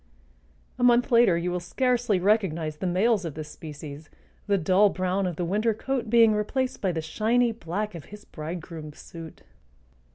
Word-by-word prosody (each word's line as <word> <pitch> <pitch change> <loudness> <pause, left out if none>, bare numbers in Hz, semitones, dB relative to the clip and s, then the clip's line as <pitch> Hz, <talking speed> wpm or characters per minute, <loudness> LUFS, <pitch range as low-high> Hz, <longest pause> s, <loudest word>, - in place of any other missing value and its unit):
A - - 0
month 245 +1 +4
later 235 -7 +5
you 175 +1 -2
will 180 - -1
scarcely 240 +2 0
recognize 175 -6 +1
the 185 - -3
males 195 +3 +2
of 165 -4 -5
this 155 -1 -7
species, 150 -1 -9 0.4
the 200 -1 +3
dull 190 +4 +4
brown 185 +1 -1
of 175 - -3
the 175 - -2
winter 215 +5 +1
coat 250 -1 -3
being 230 -1 +6
replaced 250 +5 -2
by 190 - +1
the 160 -2 -3
shiny 230 +8 +1
black 210 0 -4
of 165 -4 -9
his 210 0 -12
bridegroom's 160 -1 -7
suit. 165 -1 -11
190 Hz, 170 wpm, -26 LUFS, 165-225 Hz, 0.4 s, being